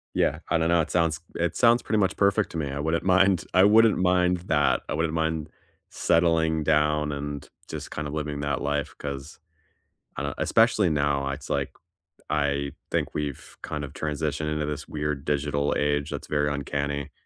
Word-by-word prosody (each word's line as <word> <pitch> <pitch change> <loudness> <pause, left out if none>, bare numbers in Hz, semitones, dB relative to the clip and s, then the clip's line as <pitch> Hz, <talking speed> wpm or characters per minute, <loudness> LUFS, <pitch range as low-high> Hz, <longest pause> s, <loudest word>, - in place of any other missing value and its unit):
Yeah. - - +1
I - - +3
don't 80 0 +1
know, 85 -1 +4
it - - -4
sounds 80 -2 +1 0.2
it 85 0 -1
sounds 120 0 +5
pretty 110 - -1
much 95 -1 +1
perfect 100 +1 +2
to 85 - -5
me. 75 -3 -2
I 70 - -4
wouldn't 80 +3 0
mind 95 -1 +3
I 95 +1 +6
wouldn't 110 +2 +6
mind 90 0 +3
that. 75 -2 +2
I - - -3
wouldn't 80 +1 -1
mind 80 -1 -1 0.4
settling 80 -2 +2
down 75 0 +2
and 70 0 -5 0.2
just - - -7
kind 75 -1 -4
of 75 - -6
living 75 -1 -3
that 70 -2 -1
life 75 0 -1
'cause, 70 0 -7 0.8
I - - -4
don't - - -3
Especially 115 -4 +3
now, 70 -2 +1
it's 70 +1 -6
like, - - -1 0.6
I 70 -2 0 0.2
think - - -1
we've 75 -3 -5
kind 75 -1 -4
of 70 +1 -7
transitioned 75 0 -2
into 75 -1 -1
this 75 -1 -5
weird 75 -2 -3
digital 75 -1 0
age 75 0 0
that's - - -6
very 75 -1 +1
uncanny, 70 0 -3
75 Hz, 185 wpm, -26 LUFS, 70-85 Hz, 0.8 s, I